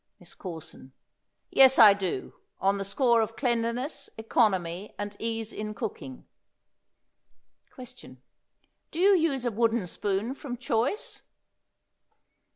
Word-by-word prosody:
MISS - - -13
CORSON. 160 -7 -9 0.6
Yes, 265 0 +6
I 215 -3 +9
do, 190 -9 -4 0.3
on 195 +1 +1
the - - -2
score 235 +3 +2
of 225 +1 -3
cleanliness, 245 +3 -2
economy 200 -4 0
and 205 0 -5
ease 225 -1 -3
in 215 0 -5
cooking. 155 - -7 1.4
Question. 250 - -13 0.7
Do - - -10
you 390 +3 +5
use 300 -7 0
a 240 - 0
wooden 230 -1 +1
spoon 200 +6 -2
from 270 -3 -7
choice? 250 - -2
225 Hz, 115 wpm, -27 LUFS, 200-250 Hz, 1.4 s, I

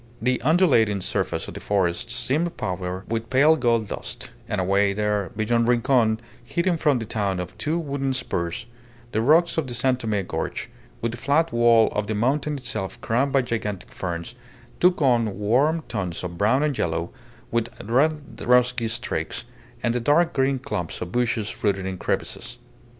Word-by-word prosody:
The 125 +1 0
undulating 130 - +4
surface 90 - -2
of - - -7
the - - -7
forests 100 +4 0
seemed 160 +8 0
powdered 90 0 -3
with 115 0 -3
pale 140 +5 +5
gold 115 -7 +1
dust; - - -6 0.2
and - - -1
away 100 +2 +2
there, 105 -1 0
beyond 115 +2 +2
Rincon, 120 -2 +3 0.2
hidden 170 +7 0
from 150 -4 +2
the 115 - -4
town 100 -3 -1
by 90 - -2
two 155 +2 0
wooded 140 -4 -2
spurs, 85 -9 -2 0.5
the 110 - +1
rocks 160 +7 +4
of 150 - -2
the 120 - -4
San 125 +1 +2
Tome 105 -5 -1
gorge, - - -4 0.3
with 115 - 0
the 120 - -7
flat 145 +5 +2
wall 120 -1 +5
of 105 0 -2
the 110 - -1
mountain 140 +6 0
itself 120 -7 -4
crowned 130 +5 +1
by 135 -1 +3
gigantic 105 -5 -4
ferns, 85 +4 -4 0.5
took 180 -3 +4
on 115 -6 +2
warm 135 +10 +2
tones 90 -6 -4
of 85 -1 -5
brown 110 - +2
and 150 -3 0
yellow, 85 0 -1 0.4
with 115 -1 0
red 145 +6 0
rusty 125 -1 +3
streaks, 110 - -3 0.4
and 120 - +2
the 125 - 0
dark 160 +8 +3
green 135 0 +2
clumps 90 -10 -4
of 90 - -5
bushes 115 -2 -1
rooted 100 -3 +1
in 95 -1 -4
crevices. 120 +6 -3
120 Hz, 170 wpm, -24 LUFS, 105-135 Hz, 0.5 s, pale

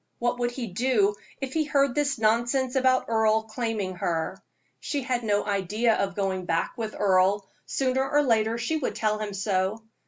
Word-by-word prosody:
What 240 +1 -1
would 240 0 +1
he 245 0 -5
do 210 0 +2 0.3
if 265 -1 -4
he 320 - +2
heard 280 -3 +2
this 285 -1 0
nonsense 240 +4 +1
about 260 -1 +3
Earle 220 -1 +2
claiming 220 -5 -3
her? 165 -2 -2 0.4
She 285 -3 -3
had 245 -2 -1
no 205 -2 +1
idea 205 +3 +1
of 195 -3 -1
going 190 -2 -1
back 165 -1 0
with 220 -2 -4
Earle 195 0 +3 0.2
sooner 265 0 0
or 295 0 +3
later 225 -3 +2
she 240 +7 -1
would 295 - -2
tell 215 -1 0
him 210 -2 -4
so. 195 +2 -1
225 Hz, 180 wpm, -26 LUFS, 200-255 Hz, 0.4 s, about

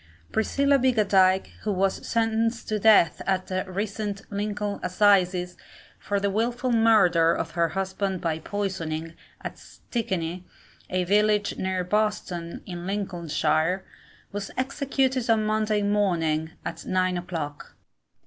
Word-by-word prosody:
Priscilla 280 +5 +2
Biggadike, 195 -7 +3
who 215 - -1
was 195 0 0
sentenced 225 0 0
to 215 -1 -1
death 205 -7 +5
at 190 -1 +1
the 185 0 -3
recent 205 +1 -3
Lincoln 205 0 -2
Assizes, 180 -2 +2 0.4
for 200 -1 -1
the 200 0 0
wilful 240 +4 0
murder 200 -8 +4
of 165 - -3
her 170 0 +1
husband 190 0 -1
by 165 -3 -1
poisoning, 165 -5 -3 0.3
at - - -7
Stickney, 185 -7 -4 0.5
a 185 0 0
village 210 +2 +2
near 185 -1 -1
Boston, 180 -4 -2
in 175 -1 -6
Lincolnshire, 180 -2 0 0.5
was 200 0 -4
executed 265 -2 0
on 220 -1 +3
Monday 215 -1 +1
morning, 170 -7 +1 0.2
at - - -5
nine 185 -1 +1
o'clock. 165 -5 -5
195 Hz, 120 wpm, -26 LUFS, 180-215 Hz, 0.5 s, death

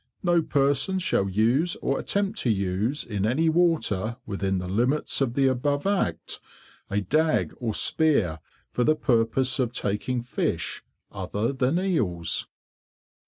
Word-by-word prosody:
No 175 -2 +3
person 145 +4 +1
shall 100 - 0
use 120 - +2
or 135 - -1
attempt 200 +1 -1
to 125 - 0
use, 100 +7 0
in 105 -4 -3
any 140 +10 +2
water 155 - +1
within 95 -2 -1
the 90 0 -4
limits 125 +11 +1
of 125 -3 0
the 140 - +3
above 140 +3 0
Act, 185 - -1 0.5
a 100 +1 0
Dag 155 - +1
or 115 -4 -2
Spear, 115 - +2 0.3
for 125 - 0
the 155 +4 +3
purpose 130 0 +1
of 125 -3 +1
taking 115 +4 -2
Fish 125 - -2 0.3
other 100 +6 -2
than 135 +4 +1
Eels. 105 - 0
125 Hz, 140 wpm, -26 LUFS, 105-155 Hz, 0.5 s, No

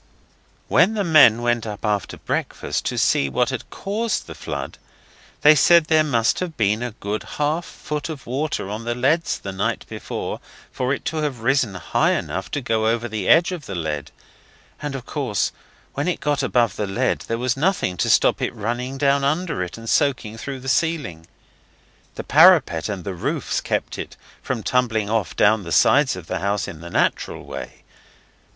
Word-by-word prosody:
When 190 +7 +4
the 205 - 0
men 140 - +6
went 120 -2 0
up 105 +1 -6
after 105 -2 -1
breakfast - - -3
to - - -2
see 70 - +2
what - - +1
had - - -5
caused 215 +3 -2
the - - -8
flood - - -6 0.6
they 150 - +8
said 170 +2 +5
there 155 0 +4
must 120 -7 +1
have 170 -5 -4
been 105 0 +1
a 125 - -2
good 105 0 -4 0.2
half 150 +3 0
foot 150 +1 -5
of 150 -4 -7
water 140 -3 -2
on 105 +3 -5
the 120 +1 -2
leads 145 +7 +1
the 100 - -6
night 95 - -2
before - - -5 0.3
for 130 0 -2
it 140 - -3
to 160 - -2
have 145 -6 -2
risen 120 -4 +1
high 90 - +1
enough 95 +5 -3
to 145 - -3
go 110 -3 0
above 115 0 0
the 105 -4 -3
edge 170 +3 +5
of 170 -6 -6
the 100 - -5
lead, 75 -4 -3 0.7
and 145 -2 -4
of 130 -2 -6
course 130 - -1 0.4
when 140 +3 -2
it 180 - -1
got 145 -1 0
above 120 -6 +1
the 105 - -2
lead 120 +7 0
there 115 - -1
was 125 0 0
nothing 160 - 0
to - - 0
stop - - +4
it - - -2
running 120 +5 -3
down 140 0 +2
under 155 - 0
it, 90 +2 -5
and 115 0 -10
soaking 125 -5 +1
through 135 +4 -6
the 130 - -10
ceiling. 130 - -1 0.9
The - - -5
parapet 80 -2 +5
and 100 -4 -4
the 95 - -4
roofs 90 - -2
kept - - -2
it - - -7 0.2
from 120 -5 -3
tumbling 115 -5 0
off 100 -8 -1
down 110 +1 +4
the 85 -3 -8
sides 135 - +4
of 90 - -9
the - - -3
house 100 +1 -1
in 80 - -9
the 85 - -8
natural - - -1
way. - - -8
120 Hz, 190 wpm, -22 LUFS, 105-145 Hz, 0.9 s, they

